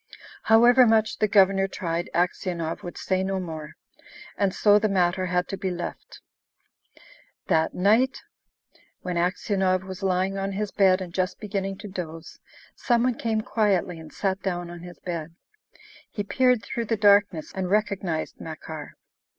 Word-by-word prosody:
However 240 Hz, +3 st, +6 dB
much 220 Hz, -1 st, +2 dB
the 215 Hz, -, +3 dB
Governor 195 Hz, -1 st, +4 dB
tried, 170 Hz, -2 st, -3 dB
Aksionov 175 Hz, -2 st, -1 dB
would 175 Hz, -, -8 dB
say 185 Hz, 0 st, -1 dB
no 190 Hz, 0 st, -1 dB
more, 160 Hz, -4 st, -7 dB, 0.6 s
and 200 Hz, -2 st, +1 dB
so 205 Hz, +2 st, +4 dB
the 215 Hz, +1 st, +1 dB
matter 185 Hz, -1 st, +1 dB
had 180 Hz, 0 st, 0 dB
to 195 Hz, -, -4 dB
be 190 Hz, -, -2 dB
left. 175 Hz, -1 st, -7 dB, 1.3 s
That 160 Hz, -3 st, +2 dB
night, 225 Hz, +8 st, +3 dB, 0.9 s
when 180 Hz, -1 st, -3 dB
Aksionov 185 Hz, +1 st, 0 dB
was 190 Hz, 0 st, -8 dB
lying 190 Hz, +1 st, 0 dB
on 195 Hz, 0 st, -2 dB
his 210 Hz, +1 st, -3 dB
bed 190 Hz, -2 st, +3 dB
and 175 Hz, -2 st, -7 dB
just 185 Hz, +1 st, -1 dB
beginning 195 Hz, -2 st, -3 dB
to -, -, -5 dB
doze, 165 Hz, -4 st, -7 dB, 0.4 s
some 240 Hz, -2 st, +1 dB
one 250 Hz, 0 st, +2 dB
came 225 Hz, -1 st, -1 dB
quietly 195 Hz, -6 st, 0 dB
and 160 Hz, -1 st, -11 dB
sat 195 Hz, -1 st, -2 dB
down 175 Hz, -2 st, -3 dB
on 175 Hz, -, -9 dB
his 175 Hz, +1 st, -11 dB
bed. 170 Hz, -2 st, -6 dB, 0.7 s
He 205 Hz, -, -4 dB
peered 250 Hz, +2 st, +2 dB
through 235 Hz, -, -3 dB
the 225 Hz, 0 st, -1 dB
darkness 200 Hz, -5 st, +3 dB
and 190 Hz, -1 st, -3 dB
recognised 195 Hz, -6 st, -1 dB
Makar. 155 Hz, -1 st, -8 dB
190 Hz, 155 wpm, -25 LUFS, 175-205 Hz, 1.3 s, However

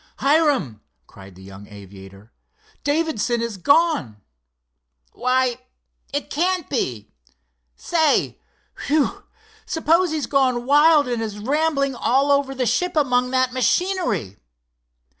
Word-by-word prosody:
"Hiram," 275 Hz, -, +1 dB, 0.2 s
cried 95 Hz, +4 st, -15 dB
the 95 Hz, -, -15 dB
young 100 Hz, +1 st, -12 dB
aviator, 100 Hz, +1 st, -14 dB, 0.5 s
"Davidson 290 Hz, -6 st, -1 dB
is 230 Hz, -3 st, -4 dB
gone!" 280 Hz, -, +1 dB, 0.9 s
"Why, 255 Hz, 0 st, 0 dB, 0.5 s
it 285 Hz, +1 st, -4 dB
can't 360 Hz, +2 st, -1 dB
be! 120 Hz, -, -3 dB, 0.6 s
Say—whew! 310 Hz, -2 st, -2 dB, 0.4 s
suppose 335 Hz, +3 st, +1 dB
he's 310 Hz, -2 st, -2 dB
gone 255 Hz, -4 st, 0 dB
wild, 295 Hz, +1 st, +4 dB
and 240 Hz, -2 st, -2 dB
is 215 Hz, -2 st, -5 dB
rambling 275 Hz, +4 st, 0 dB
all 270 Hz, +3 st, +1 dB
over 280 Hz, -1 st, +1 dB
the 255 Hz, -1 st, -1 dB
ship 285 Hz, -, -1 dB
among 250 Hz, -4 st, +1 dB
that 255 Hz, -1 st, 0 dB
machinery!" 255 Hz, -, -1 dB
260 Hz, 105 wpm, -21 LUFS, 210-305 Hz, 0.9 s, wild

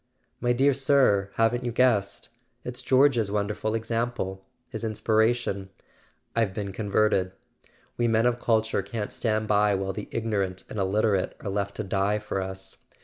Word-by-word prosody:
"My 120 Hz, -, +1 dB
dear 135 Hz, +3 st, +3 dB
sir, 130 Hz, -7 st, +3 dB
haven't 115 Hz, +2 st, +2 dB
you 120 Hz, -, -2 dB
guessed? 115 Hz, -5 st, +1 dB, 0.3 s
It's 125 Hz, +1 st, -6 dB
George's 130 Hz, -4 st, +3 dB
wonderful 105 Hz, +1 st, -1 dB
example... 115 Hz, -4 st, -2 dB, 0.2 s
his -, -, -7 dB
inspiration... 110 Hz, -2 st, 0 dB, 0.7 s
I've 110 Hz, -5 st, +1 dB
been 100 Hz, -2 st, -3 dB
converted! 100 Hz, -2 st, +1 dB, 0.6 s
We 120 Hz, -, +2 dB
men 115 Hz, 0 st, +2 dB
of 120 Hz, 0 st, +2 dB
culture 110 Hz, -3 st, +1 dB
can't 105 Hz, +2 st, -5 dB
stand 110 Hz, -2 st, -1 dB
by 105 Hz, -1 st, +3 dB
while 95 Hz, 0 st, -2 dB
the 105 Hz, +1 st, -7 dB
ignorant 100 Hz, -5 st, -2 dB
and 110 Hz, -, -4 dB
illiterate 100 Hz, 0 st, +1 dB
are 100 Hz, -, -4 dB
left 100 Hz, 0 st, -2 dB
to 110 Hz, -, -3 dB
die 100 Hz, +1 st, 0 dB
for 100 Hz, -2 st, -3 dB
us. 95 Hz, 0 st, -7 dB
110 Hz, 150 wpm, -26 LUFS, 100-115 Hz, 0.7 s, dear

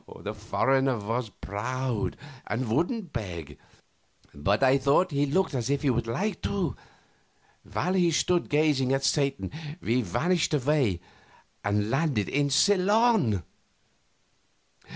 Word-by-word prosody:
The 105 Hz, -, -4 dB
foreigner 130 Hz, +4 st, +1 dB
was 115 Hz, +3 st, -3 dB
proud 120 Hz, +4 st, -3 dB, 0.3 s
and 115 Hz, +3 st, -2 dB
wouldn't 175 Hz, -, -1 dB
beg, 85 Hz, -, -6 dB, 0.7 s
but 100 Hz, -, 0 dB
I 135 Hz, +1 st, +5 dB
thought 145 Hz, +7 st, +3 dB
he 145 Hz, 0 st, +1 dB
looked 185 Hz, +4 st, +1 dB
as 125 Hz, -2 st, -2 dB
if 140 Hz, +1 st, 0 dB
he 140 Hz, -, +3 dB
would 120 Hz, -1 st, -1 dB
like 175 Hz, -, -2 dB
to. 180 Hz, -, -1 dB, 1.0 s
While 180 Hz, -, 0 dB
he 180 Hz, -2 st, +3 dB
stood 175 Hz, +2 st, +1 dB
gazing 145 Hz, -3 st, +2 dB
at 135 Hz, 0 st, 0 dB
Satan 140 Hz, -9 st, 0 dB, 0.3 s
we 125 Hz, -5 st, +1 dB
vanished 160 Hz, -, 0 dB
away 130 Hz, -, +1 dB, 0.6 s
and 105 Hz, +1 st, 0 dB
landed 135 Hz, -, 0 dB
in 145 Hz, 0 st, +1 dB
Ceylon. 200 Hz, -, +3 dB
135 Hz, 125 wpm, -27 LUFS, 110-160 Hz, 1.0 s, I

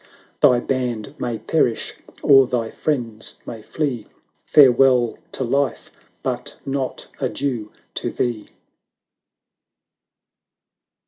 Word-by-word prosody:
"Thy 125 Hz, -, +6 dB
band 120 Hz, -5 st, -2 dB
may 120 Hz, -2 st, -2 dB
perish, 125 Hz, -3 st, 0 dB, 0.3 s
or 135 Hz, -2 st, +7 dB
thy 115 Hz, -3 st, -1 dB
friends 115 Hz, -7 st, -3 dB
may 115 Hz, -, -7 dB
flee, 125 Hz, -2 st, -3 dB, 0.2 s
" -, -, -43 dB
Farewell 130 Hz, -3 st, +5 dB
to 135 Hz, -, -2 dB
Life 140 Hz, +3 st, -1 dB, 0.2 s
— -, -, -40 dB
but -, -, -3 dB
not 135 Hz, -1 st, -2 dB
Adieu 120 Hz, -7 st, -2 dB, 0.2 s
to -, -, -2 dB
thee!" 120 Hz, -4 st, -2 dB
125 Hz, 105 wpm, -21 LUFS, 115-135 Hz, 0.3 s, or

